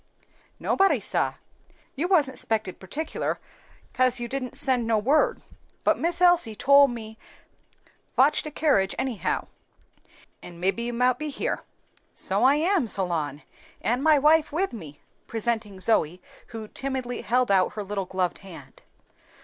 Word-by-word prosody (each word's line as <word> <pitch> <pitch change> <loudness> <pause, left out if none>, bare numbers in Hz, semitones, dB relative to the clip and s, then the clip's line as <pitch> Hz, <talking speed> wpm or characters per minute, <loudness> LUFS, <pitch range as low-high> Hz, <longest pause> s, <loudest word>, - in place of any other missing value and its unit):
"Nobody, 390 0 +2
sah. - - -1 0.6
You 310 +6 -1
wasn't 300 -8 +2
spected 215 -4 -2
particular, 295 +12 -4 0.5
kase 255 -2 +2
you 240 - -4
didn't 265 +1 -4
send 260 -5 +1
no 225 -1 +2
word. 300 - +2 0.4
But - - +2
Miss 340 +1 -1
Elsie 350 -11 +4
tole 280 +5 +6
me 220 -3 -8 1.0
fotch 275 +3 +4
de 305 - -6
kerridge 275 -11 +1
anyhow, 260 -5 -2 1.0
an' 175 -1 -11
mebbe 195 +5 0
you 235 +1 -2
mout 250 +1 +1
be 305 - -3
here." 280 - -3 0.5
"So - - +1
I 270 +2 +6
am, 335 -2 +1
Solon, 165 -8 -2 0.4
and 245 +4 -1
my 310 -1 +5
wife 305 +2 +4
with 365 +3 -1
me," 155 -10 -10 0.3
presenting 225 -3 -3
Zoe, 180 -4 +2 0.3
who 225 -2 -8
timidly 260 0 -4
held 250 -2 +1
out 190 -2 +3
her 210 - -4
little 200 -1 -3
gloved 185 -1 -2
hand. 160 -9 -13
240 Hz, 140 wpm, -25 LUFS, 200-285 Hz, 1.0 s, tole